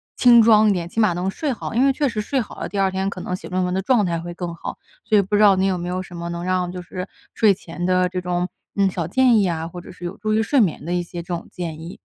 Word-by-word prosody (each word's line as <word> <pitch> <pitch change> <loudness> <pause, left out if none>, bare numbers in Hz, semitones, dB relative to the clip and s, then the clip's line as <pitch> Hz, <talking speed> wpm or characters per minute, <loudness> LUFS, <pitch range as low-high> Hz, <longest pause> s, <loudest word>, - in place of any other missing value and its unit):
轻 240 -2 +7
装 215 -1 +6
一 - - +4
点， 175 -3 -2
起 225 - -1
码 210 -4 +4
能 180 +2 -2
睡 290 +8 -2
好。 235 - -5
因 255 +4 +4
为 275 - +5
确 285 +2 0
实 220 -4 -2
睡 265 +5 -1
好 230 - -6
了， - - -3
第 200 - -3
二 195 - +3
天 190 +1 -1
可 195 - -7
能 180 - -3
写 - - -9
论 185 0 0
文 180 - -2
的 190 - 0
状 215 -1 +3
态 170 -1 -1
会 175 +1 -6
更 170 -1 -5
好， - - -7 0.3
所 215 - +3
以 - - +6
不 200 +2 -1
知 210 - +3
道 200 -2 +6
你 190 - +2
有 190 -2 +1
没 175 0 -4
有 185 +1 -2
什 185 -1 -10
么 170 0 -5
能 170 0 -4
让 180 -1 0
就 180 0 -6
是 180 +1 -6 0.3
睡 210 -3 +4
前 175 -1 -6
的 185 0 +3
这 180 0 -4
种 180 0 -1 0.3
嗯， 195 -1 +4
小 175 -3 -3
建 250 +4 +4
议 200 - +3
啊， 165 -1 -3
或 175 +1 -9
者 - - -12
是 175 -1 -10
有 175 - -5
助 215 +1 -1
于 220 - +3
睡 265 +3 +3
眠 160 -6 0
的 175 - -2
一 175 0 0
些 175 0 -7
这 - - -14
种 170 - -8
建 160 -3 -6
议。 170 +2 -9
185 Hz, 345 characters per minute, -22 LUFS, 175-210 Hz, 0.3 s, 轻